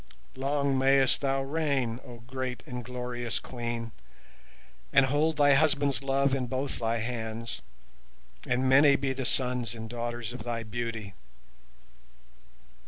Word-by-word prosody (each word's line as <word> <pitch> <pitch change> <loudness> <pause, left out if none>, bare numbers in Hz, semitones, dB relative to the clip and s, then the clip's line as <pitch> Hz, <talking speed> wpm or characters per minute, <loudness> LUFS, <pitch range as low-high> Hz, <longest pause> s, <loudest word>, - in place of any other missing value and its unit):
Long 140 0 +1
mayst 135 0 +4
thou 135 -1 +1
reign, 135 -5 0
O 120 -1 -11
great 130 0 -4
and 125 -4 -6
glorious 125 -1 -4
Queen, 120 -2 -4 1.0
and 140 -1 +6
hold 150 +3 +1
thy 145 -1 +6
husband's 140 -3 +3
love 135 0 +2
in 130 -2 0
both 135 +2 -2
thy 115 0 0
hands, 115 -1 -4 0.9
and 125 +1 +1
many 140 +2 +7
be 135 -1 0
the 130 -1 -4
sons 125 -3 0
and 110 0 -6
daughters 120 0 -4
of 125 - -7
thy 115 0 -3
beauty. 115 -2 -4
125 Hz, 130 wpm, -29 LUFS, 120-135 Hz, 1.0 s, many